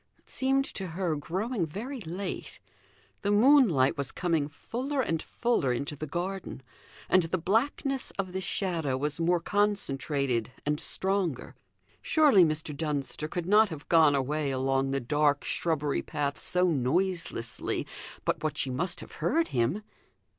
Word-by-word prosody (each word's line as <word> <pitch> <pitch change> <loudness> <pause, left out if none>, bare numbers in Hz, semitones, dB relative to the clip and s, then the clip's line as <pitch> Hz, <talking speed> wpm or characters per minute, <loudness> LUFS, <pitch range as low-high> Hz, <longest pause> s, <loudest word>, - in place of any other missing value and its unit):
It - - -36
seemed 270 +1 +1
to 190 -7 -5
her 170 -1 -1
growing 190 - -2
very 240 - -6
late; 180 - -6 0.6
the 200 - -1
moonlight 205 - +5
was 140 -2 -2
coming 165 -5 0
fuller 255 - -4
and 165 -11 0
fuller 235 - 0
into 140 +5 -3
the 155 +2 -6
garden 175 -2 -4 0.4
and 185 - +5
the 170 +2 -1
blackness 255 - 0
of 185 -2 -3
the 190 - -2
shadow 170 -8 -1
was 145 +3 -2
more 175 +1 +2
concentrated 140 - 0
and 150 0 0
stronger. 190 -8 0 0.5
Surely 290 - +5
Mr. 155 -2 -1
Dunster 150 0 -2
could 175 +2 -4
not 210 +3 +5
have 155 -3 -8
gone 160 -4 +6
away 145 +2 0
along 135 0 0
the 135 0 0
dark 145 +3 +1
shrubbery 150 -4 0
path 145 -2 -2
so 180 0 +1
noiselessly 165 -3 0 0.4
but - - -1
what 155 -1 -1
she 130 - 0
must 170 +9 -2
have - - -11
heard 330 +1 +1
him? 130 - 0
165 Hz, 145 wpm, -29 LUFS, 145-195 Hz, 0.6 s, gone